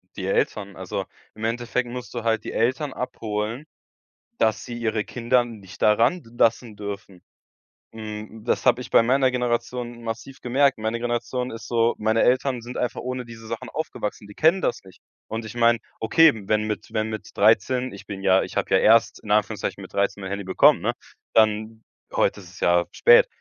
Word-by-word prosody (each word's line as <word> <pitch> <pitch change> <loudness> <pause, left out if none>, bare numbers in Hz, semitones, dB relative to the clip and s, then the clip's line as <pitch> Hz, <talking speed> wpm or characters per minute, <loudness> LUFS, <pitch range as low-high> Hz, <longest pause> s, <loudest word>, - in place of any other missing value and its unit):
Die 95 - -5
Eltern. 100 0 -1
Also, 95 -1 -4 0.3
im 110 - -9
Endeffekt 120 +2 -1
musst 125 0 -7
du 120 -2 -4
halt 110 -1 +1
die - - -5
Eltern 130 +5 0
abholen, 110 +2 -4 0.7
dass 110 -1 +1
sie 120 - -6
ihre 110 -2 -1
Kinder 125 +2 +1
nicht 100 -5 -12
da 105 - +6
ran 125 +10 +2
lassen 115 -1 0
dürfen. 100 -3 -7 0.7
Hm, 110 0 -8
das - - 0
habe 120 - +4
ich - - -8
bei - - +5
meiner 130 +2 +3
Generation 120 -1 -2
massiv 115 +4 -6
gemerkt. 135 +3 +2
Meine 110 +2 -2
Generation 120 +1 -2
ist 115 -3 -8
so 115 0 +2
meine 110 +1 +2
Eltern 130 -1 +2
sind 120 +2 -8
einfach 125 - -2
ohne 125 0 -4
diese 115 -1 -11
Sachen 115 0 -5
aufgewachsen, 105 -9 -5
die 105 - -12
kennen 165 - +3
das - - -1
nicht. 95 - -17 0.3
Und 115 +1 -4
ich 110 +2 -9
meine, 120 -1 +4 0.2
okay, 160 +8 +6 0.2
wenn 105 0 +2
mit 105 0 -4
wenn 110 0 0
mit 110 -1 -6
13 125 +5 +3
ich 100 - -11
bin 100 -1 -6
ja 95 0 +4
ich - - -8
habe - - -1
ja - - +7
erst 115 +1 +4
in 105 - -5
Anführungszeichen 105 -1 0
mit - - -10
13 100 0 0
mein 95 - -5
Handy 100 0 -4
bekommen, 95 - +5
ne? - - 0 0.4
Dann 110 0 +2 0.3
heute - - +1
ist 90 -3 -13
es 90 - -14
ja 85 0 +3
spät. 480 +1 +6
115 Hz, 190 wpm, -24 LUFS, 105-125 Hz, 0.7 s, ja